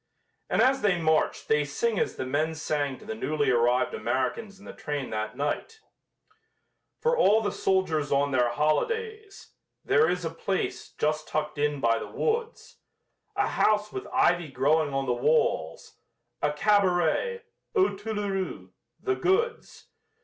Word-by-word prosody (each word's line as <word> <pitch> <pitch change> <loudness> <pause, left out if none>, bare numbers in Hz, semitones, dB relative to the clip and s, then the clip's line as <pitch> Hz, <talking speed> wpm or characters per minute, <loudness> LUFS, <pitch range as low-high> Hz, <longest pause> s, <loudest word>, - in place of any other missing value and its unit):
And - - +3
as 265 +1 +3
they 190 -4 +2
march 160 -1 +1
they 150 0 +2
sing 200 +9 -1
as - - -1
the - - -4
men 155 +5 -1
sang 145 -4 -2
to - - -15
the 220 - -4
newly 155 -10 0
arrived 120 +1 +2
Americans 200 - -2
in 200 - -16
the - - -9
train 145 -3 -4
that 110 +2 -4
night: 145 - -3 1.2
For 475 +1 +1
all 210 - +5
the 205 -3 -1
soldiers, 180 -8 0
on 140 0 +2
their 125 -2 +2
holidays, 430 - -2 0.4
There 455 - +4
is 180 -1 -2
a 165 - -2
place, 190 +3 -3
just 155 0 -1
tucked 150 -1 -3
in 145 -1 0
by 115 -1 +2
the - - -6
woods, 460 0 -3 0.6
A - - +2
house 210 0 +2
with 390 - -6
ivy 175 -10 +2
growing 145 +3 +2
on 135 0 -1
the 125 - +1
walls 120 - 0 0.4
A 150 - +2
cabaret 200 - +2 0.3
"Aux 385 - +3
Toulourous" 205 -2 -4 0.3
the 395 - 0
goods! 445 +6 -1
160 Hz, 150 wpm, -27 LUFS, 145-220 Hz, 1.2 s, all